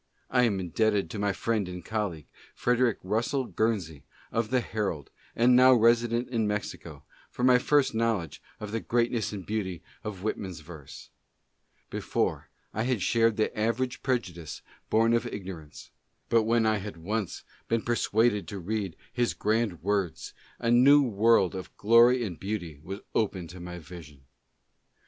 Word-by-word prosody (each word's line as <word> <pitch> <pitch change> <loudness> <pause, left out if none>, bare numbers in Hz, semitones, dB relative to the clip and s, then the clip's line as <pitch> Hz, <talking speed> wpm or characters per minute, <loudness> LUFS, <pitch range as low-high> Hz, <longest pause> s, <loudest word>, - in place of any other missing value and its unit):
I 125 -1 +4
am 100 -4 0
indebted 100 0 0
to 105 - -5
my 100 0 +1
friend 105 -1 -1
and 90 -1 -8
colleague, 100 -9 -3 0.3
Frederick 125 -1 +2
Russell 120 +7 0
Guernsey, 95 - -1 0.3
of 115 -1 -1
the 130 - +2
Herald, 105 - -3 0.2
and 125 +2 +5
now 130 +1 +7
resident 115 +1 +3
in 115 -4 0
Mexico, 105 0 -5 0.3
for 125 - -5
my 125 -1 +6
first 145 0 +2
knowledge 110 -9 -1 0.2
of 105 -1 -6
the 115 - -1
greatness 120 -1 0
and 100 -4 -6
beauty 95 -5 -3 0.2
of 100 -3 -6
Whitman's 95 -5 -4
verse. 80 -3 -12 0.8
Before, - - -2 0.2
I 110 - -2
had 120 -5 0
shared 115 +2 +2
the 110 - 0
average 115 +4 -1
prejudice 90 - -3 0.3
born 115 +1 +3
of 115 +1 +1
igno 95 -6 -6
rance; 75 -1 -14 0.4
but 115 -2 +3
when 115 0 +2
I 110 -1 +3
had 100 -2 -7
once 100 +4 -3 0.2
been 115 -1 0
persuaded 115 -2 +1
to 100 - -6
read 95 -1 -3 0.2
his 120 -1 0
grand 105 -5 0
words, 100 -3 -1 0.2
a 115 - 0
new 140 +4 +7
world 110 -4 +3
of 95 -1 -8
glory 120 +3 +5
and 90 -7 -5
beauty 90 -7 -4
was 95 +5 -7
opened 95 -6 -1
to 90 - -10
my 90 0 -7
vision. 80 -5 -12
110 Hz, 160 wpm, -28 LUFS, 95-115 Hz, 0.8 s, now